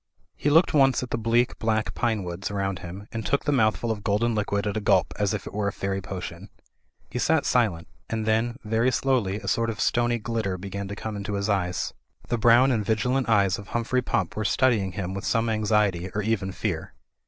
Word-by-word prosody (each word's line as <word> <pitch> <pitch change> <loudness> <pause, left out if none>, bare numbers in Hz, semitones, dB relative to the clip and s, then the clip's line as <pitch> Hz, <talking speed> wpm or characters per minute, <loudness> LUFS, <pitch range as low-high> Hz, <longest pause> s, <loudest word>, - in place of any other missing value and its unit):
He 145 - 0
looked 165 +4 +5
once 135 -3 +4
at 125 - -7
the - - 0
bleak, 115 +2 +1
black 110 -1 0
pinewoods 95 -6 -2
around 100 -2 -2
him 95 +4 -8
and 115 0 -4
took 140 +6 0
the 145 - +2
mouthful 115 -2 +2
of 105 -2 -4
golden 115 +3 +1
liquid 100 -1 -1
at 105 0 -2
a 110 - -1
gulp, - - +2
as - - +1
if - - -3
it - - -8
were 105 0 -1
a - - 0
fairy 95 0 -3
potion. 95 0 -7 0.6
He 125 - -3
sat 160 +3 +2
silent; 105 -10 +1 0.2
and 110 -1 -2
then, 115 +2 +1
very 115 +3 +2
slowly, 120 -6 +1
a - - -9
sort 115 0 +1
of 115 0 -4
stony 120 +1 +2
glitter 110 -4 -2
began 100 +1 -5
to 100 - -5
come 110 +1 -5
into 100 0 -4
his 100 +1 -1
eyes. 90 -3 -1 0.4
The 120 - 0
brown 120 +4 +6
and 110 -4 +1
vigilant 115 +5 0
eyes 100 -4 +3
of 100 - -10
Humphrey 120 +2 0
Pump 95 -7 -1
were 110 - -2
studying 110 -5 +2
him 95 -3 -4
with 100 +1 -5
some 115 -1 +1
anxiety 105 -4 +1
or 105 - 0
even 100 -3 -1
fear. 90 - -4
110 Hz, 215 wpm, -25 LUFS, 100-120 Hz, 0.6 s, brown